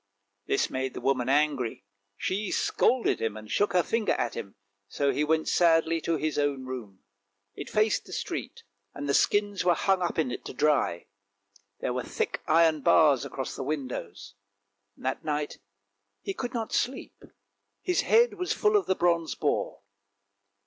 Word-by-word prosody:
This - - +1
made 130 0 -3
the - - -4
woman 130 -2 0
angry, 140 -7 +1 0.3
she 200 +2 -2
scolded 250 -1 +1
him 110 -1 -2
and 110 0 -10
shook 205 - +1
her 180 -1 +4
finger 225 +3 0
at 115 - -1
him, 100 - -7 0.3
so 140 +6 0
he 150 - 0
went 160 +1 +1
sadly 165 -1 +3
to 165 - 0
his 155 -1 -1
own 140 -2 0
room. 115 -7 -8 0.5
It 145 - -8
faced 215 0 +1
the - - -13
street, - - -5 0.3
and 145 - -5
the 140 - +1
skins 205 +1 +2
were 175 -1 +4
hung 190 +2 +1
up 175 - -1
in 155 -6 +1
it - - -5
to - - -7
dry; 135 - +1 0.8
there 125 - -1
were 125 - -1
thick - - -3
iron 160 -1 +4
bars 150 -4 +4
across 130 - -5
the - - -5
windows. 130 - -5 0.6
That 130 +1 -3
night 150 -1 -3 0.6
he 195 - -3
could 245 +4 -5
not 225 -2 -3
sleep, 260 +2 -2 0.6
his 360 -1 +1
head 470 +2 +4
was 360 - 0
full 425 0 +2
of 410 - +2
the 190 - +2
bronze 170 -2 +1
boar. - - -1
155 Hz, 170 wpm, -28 LUFS, 130-190 Hz, 0.8 s, her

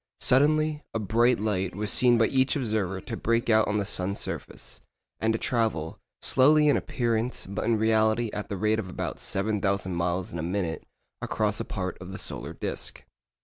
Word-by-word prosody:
Suddenly 150 +3 +3
a - - +1
bright 115 +3 +2
light 95 -4 -1
was 105 +1 -1
seen 120 -1 +5
by 115 - +4
each 130 +2 +2
observer 105 -8 -1
to 115 - -5
break 115 +1 +1
out 110 0 +4
on 105 - 0
the 100 - 0
sun's 95 +1 -2
surface, - - -6 0.4
and 110 - +2
to 110 - 0
travel, 110 -11 -1 0.2
slowly 150 +3 +5
in 145 - +5
appearance, 120 -1 -1
but 100 +2 -4
in 115 0 +2
reality 110 +1 +2
at 105 - -5
the 100 - -3
rate 110 +3 +1
of 95 -4 -5
about 90 - -4
7,000 100 -2 -1
miles 85 +1 -1
in 85 - -4
a - - -1
minute, 85 -1 -3 0.3
across 105 -1 -1
a 115 - -3
part 95 -2 -4
of 90 +1 -8
the - - -5
solar - - -6
disc. - - -4
110 Hz, 190 wpm, -27 LUFS, 95-115 Hz, 0.4 s, seen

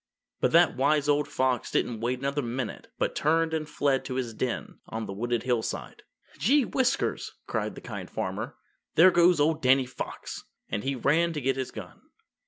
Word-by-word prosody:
But - - +2
that - - +6
wise 145 +2 +2
old 145 0 +2
fox 130 -4 0
didn't 115 -3 0
wait 120 +3 -1
another 140 +2 -1
minute 120 -1 -4
but - - 0
turned 160 +2 +2
and 155 -1 -2
fled 140 -3 +1
to 130 - -4
his 125 -3 -2
den 125 +2 -3
on 110 0 -4
the 100 - -6
wooded 120 +3 -1
hillside. 120 -3 -2 0.4
"Gee 275 +5 +4
whiskers!" 260 +2 0
cried - - -2
the - - -9
Kind - - -7
Farmer, - - -4 0.4
"there 185 - +8
goes 175 -1 +5
old 155 +2 +2
Danny 130 0 +4
Fox," 125 - -7 0.2
and 105 - -2
he 135 0 -1
ran 160 +7 +2
to 150 - -2
get 135 0 +1
his 130 -1 -3
gun. - - -10
135 Hz, 185 wpm, -28 LUFS, 125-155 Hz, 0.4 s, there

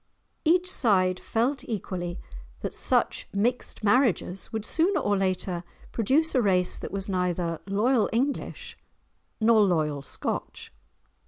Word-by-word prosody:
Each 350 +3 +3
side 185 - +2
felt 250 +5 -1
equally 180 -5 -4 0.4
that - - -4
such - - +1
mixed 230 +3 0
marriages 205 -4 +1
would 220 -2 -4
sooner 355 - +2
or 205 0 +1
later 185 -2 -1 0.3
produce 275 +9 +2
a 255 - +3
race 185 -4 +2
that - - -7
was 195 0 -4
neither 180 -3 -1
loyal 215 +4 +2
English 265 +5 -2 0.6
nor 225 -1 +5
loyal 155 -7 +1
Scotch. - - -5
205 Hz, 120 wpm, -26 LUFS, 185-245 Hz, 0.6 s, nor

